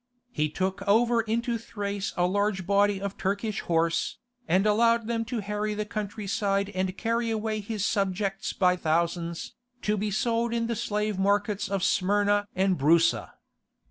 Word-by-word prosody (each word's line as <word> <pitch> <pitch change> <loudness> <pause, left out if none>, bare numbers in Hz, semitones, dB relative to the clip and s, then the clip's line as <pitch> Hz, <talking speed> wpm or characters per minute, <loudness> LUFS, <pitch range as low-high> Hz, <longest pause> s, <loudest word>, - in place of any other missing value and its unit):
He 155 -7 0
took 190 +5 -2
over 230 +3 +4
into 230 +1 -1
Thrace 200 -3 -4
a 175 - +3
large 200 0 0
body 200 +1 +3
of 200 0 -5
Turkish 200 +2 -1
horse, 165 0 0 0.3
and 185 +5 +3
allowed 230 +2 +3
them 230 0 -1
to 225 0 -3
harry 210 +1 -2
the 210 0 -2
country 210 0 -5
side 200 0 0
and 185 -1 -2
carry 230 0 0
away 220 -1 -1
his 210 -1 -3
subjects 195 0 -1
by 180 -1 +2
thousands, 170 0 -1 0.3
to 210 0 +1
be 210 +1 -1
sold 230 +3 0
in 230 0 0
the 230 0 -1
slave 210 -1 -1
markets 205 +1 +1
of 195 -2 -1
Smyrna 205 +1 +2
and 190 -2 +1
Broussa. 165 +4 +3
205 Hz, 160 wpm, -27 LUFS, 190-215 Hz, 0.3 s, over